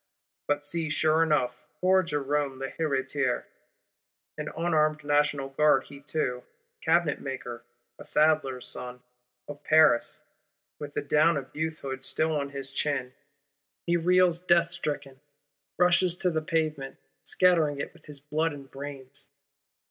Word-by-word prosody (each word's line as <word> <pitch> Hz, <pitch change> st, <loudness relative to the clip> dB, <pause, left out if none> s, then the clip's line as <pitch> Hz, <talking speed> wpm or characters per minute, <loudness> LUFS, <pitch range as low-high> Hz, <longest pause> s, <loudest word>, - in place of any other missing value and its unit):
But 145 Hz, 0 st, 0 dB
see, 160 Hz, +1 st, -2 dB
sure 155 Hz, +1 st, +2 dB
enough, 150 Hz, -6 st, +1 dB, 0.2 s
poor 190 Hz, +1 st, +4 dB
Jerôme 145 Hz, -4 st, -1 dB
l'Héritier, 135 Hz, -2 st, -1 dB, 0.9 s
an 150 Hz, 0 st, -5 dB
unarmed 155 Hz, -3 st, +1 dB
National 145 Hz, -1 st, +1 dB
Guard 135 Hz, -1 st, +3 dB
he 140 Hz, -, -12 dB
too, 140 Hz, -4 st, -2 dB, 0.4 s
"cabinet 165 Hz, -2 st, +2 dB
maker, 125 Hz, -3 st, -6 dB, 0.4 s
a -, -, -8 dB
saddler's 150 Hz, -5 st, +1 dB
son, 125 Hz, 0 st, -6 dB, 0.4 s
of 145 Hz, 0 st, -9 dB
Paris," 155 Hz, -7 st, +4 dB, 0.6 s
with 145 Hz, -1 st, -8 dB
the -, -, -1 dB
down 150 Hz, +3 st, +3 dB
of 135 Hz, -2 st, -7 dB
youthhood 150 Hz, -4 st, -4 dB
still 155 Hz, +3 st, 0 dB
on 140 Hz, -1 st, -2 dB
his 135 Hz, -1 st, -6 dB
chin,—he 140 Hz, +3 st, -4 dB
reels 180 Hz, 0 st, +3 dB
death 170 Hz, -1 st, +3 dB
stricken; 145 Hz, -5 st, -4 dB, 0.6 s
rushes 180 Hz, 0 st, +4 dB
to 180 Hz, 0 st, 0 dB
the 160 Hz, -1 st, -1 dB
pavement, 155 Hz, -4 st, -2 dB, 0.3 s
scattering 165 Hz, -6 st, +3 dB
it 140 Hz, -, -5 dB
with -, -, -20 dB
his 145 Hz, -2 st, -7 dB
blood 150 Hz, +3 st, -1 dB
and 140 Hz, -2 st, -11 dB
brains! 140 Hz, -1 st, -8 dB
150 Hz, 130 wpm, -28 LUFS, 140-160 Hz, 0.9 s, poor